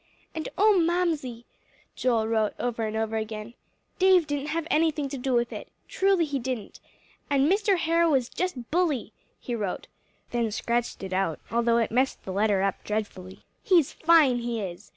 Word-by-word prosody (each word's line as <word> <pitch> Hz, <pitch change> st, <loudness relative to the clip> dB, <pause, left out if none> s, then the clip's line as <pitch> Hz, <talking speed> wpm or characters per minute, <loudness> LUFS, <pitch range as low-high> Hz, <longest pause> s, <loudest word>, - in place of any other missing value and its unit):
"And 315 Hz, -, -4 dB
oh, 415 Hz, -1 st, +5 dB
Mamsie," 320 Hz, -9 st, -1 dB, 0.5 s
Joel 230 Hz, -3 st, +1 dB
wrote 220 Hz, -2 st, 0 dB
over 230 Hz, -2 st, -2 dB
and 215 Hz, +1 st, -3 dB
over, 220 Hz, 0 st, -1 dB
"Dave 215 Hz, -1 st, -7 dB, 0.8 s
didn't 290 Hz, -1 st, -3 dB
have 320 Hz, +1 st, -2 dB
anything 310 Hz, -2 st, +2 dB
to 275 Hz, -, -5 dB
do 260 Hz, +1 st, -1 dB
with 240 Hz, -1 st, +1 dB
it -, -, -7 dB, 0.2 s
truly 385 Hz, -3 st, +2 dB
he 285 Hz, -2 st, -2 dB
didn't. 250 Hz, -4 st, -5 dB, 0.5 s
And 280 Hz, 0 st, +3 dB
Mr. 395 Hz, +2 st, +2 dB
Harrow 335 Hz, -2 st, +2 dB
is 255 Hz, -3 st, +1 dB
just 270 Hz, -10 st, -4 dB
bully," 310 Hz, -10 st, 0 dB, 0.3 s
he 245 Hz, -, -5 dB
wrote, 205 Hz, -5 st, -3 dB, 0.5 s
then 235 Hz, -2 st, 0 dB
scratched 235 Hz, 0 st, -2 dB
it 190 Hz, -1 st, -5 dB
out 185 Hz, -4 st, 0 dB
although 235 Hz, 0 st, +2 dB
it 230 Hz, -, 0 dB
mussed 260 Hz, +3 st, 0 dB
the 190 Hz, -, -5 dB
letter 200 Hz, -1 st, +2 dB
up 195 Hz, -1 st, -1 dB
dreadfully 200 Hz, -3 st, -5 dB, 0.2 s
"he's 350 Hz, -, +3 dB
fine, 315 Hz, -7 st, +4 dB
he 235 Hz, -1 st, -3 dB
is! 180 Hz, -4 st, -7 dB
245 Hz, 170 wpm, -26 LUFS, 220-320 Hz, 0.8 s, oh